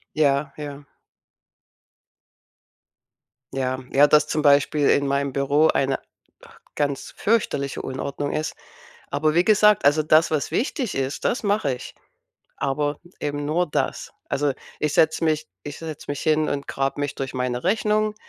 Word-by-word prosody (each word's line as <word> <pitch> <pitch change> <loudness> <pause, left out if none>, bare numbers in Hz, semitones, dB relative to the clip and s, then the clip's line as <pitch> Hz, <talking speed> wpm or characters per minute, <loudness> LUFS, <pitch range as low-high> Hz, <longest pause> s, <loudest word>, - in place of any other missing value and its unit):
Ja, 140 -2 +2
ja. 145 -1 -7 2.7
Ja, 130 -1 -2
ja, 145 +2 +6
dass 150 0 +4
zum 155 - -1
Beispiel 145 0 +4
in 140 -1 +3
meinem 140 -1 0
Büro 145 +3 +3
eine 135 -2 +1 0.8
ganz 140 -2 -2
fürchterliche 170 -11 0
Unordnung 140 +2 -4
ist. 155 +1 -2 0.5
Aber 155 +1 +1
wie 175 - +4
gesagt, 210 -4 +5
also, 150 +2 +4
das, 155 +1 +4
was 150 -2 -1
wichtig 245 - -1
ist, 135 +1 -2
das 240 - 0
mache 200 -10 +1
ich, 125 - -10 0.6
aber 145 +1 -1 0.2
eben 145 0 -3
nur 175 +4 +1
das. - - -2 0.2
Also, 140 0 0 0.3
ich 150 -1 0
setze 160 +1 +3
mich 155 -1 0 0.2
ich 145 -1 -7
setze 160 -3 -7
mich 145 - -3
hin 155 0 +2
und 140 0 -3
grab 135 +1 -2
mich 145 -1 -2
durch 135 -1 -4
meine 125 -1 -2
Rechnung 215 +2 +1
145 Hz, 145 wpm, -23 LUFS, 140-155 Hz, 2.7 s, ja